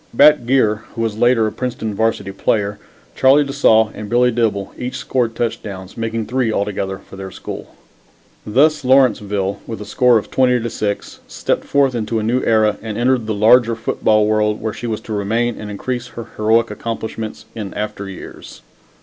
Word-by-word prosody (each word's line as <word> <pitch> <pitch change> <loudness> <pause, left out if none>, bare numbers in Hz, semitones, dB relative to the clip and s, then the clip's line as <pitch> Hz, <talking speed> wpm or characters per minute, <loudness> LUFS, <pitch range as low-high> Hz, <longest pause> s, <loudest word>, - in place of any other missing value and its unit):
Bat 145 -4 +6
Geer, 115 -5 +3 0.2
who 115 - -3
was 110 -1 -2
later 120 -2 +4
a 110 - -1
Princeton 120 -3 -4
Varsity 110 -2 -1
player, 100 +1 -1 0.4
Charlie 135 +3 +5
de 140 -1 -5
Saulles 110 -5 +4
and 105 -1 -7
Billy 125 +1 +3
Dibble, 110 -4 -1
each 125 +1 -5
scored 120 -3 -1
touchdowns, 100 -5 -4
making 115 -1 -3
three 125 -1 0
altogether 100 -2 -2
for 95 - -14
their 95 0 -6
school. - - -8 0.7
Thus 150 +8 +2
Lawrenceville, 105 -7 +2
with 115 - -5
the 105 - -8
score 120 +2 +4
20 125 +3 +1
to 115 - -3
6, 100 -1 -3
stepped - - -2
forth 140 -2 +2
into 115 -1 -2
a 110 - -1
new 120 +4 +1
era 110 -2 +3
and 110 -2 -5
entered 120 -1 +1
the 110 - -1
larger 115 +2 +5
football 110 -1 +1
world 105 0 +1
where 110 -1 -3
she 120 - -6
was 110 -1 -3
to 110 - -6
remain 110 +4 -1
and 105 - -6
increase 120 +4 -4
her 120 -1 -9
heroic 110 +2 +2
accomplishments 110 -1 -5
in 105 -4 -6
after 105 -1 -4
years. 95 - -11
110 Hz, 180 wpm, -18 LUFS, 105-120 Hz, 0.7 s, Bat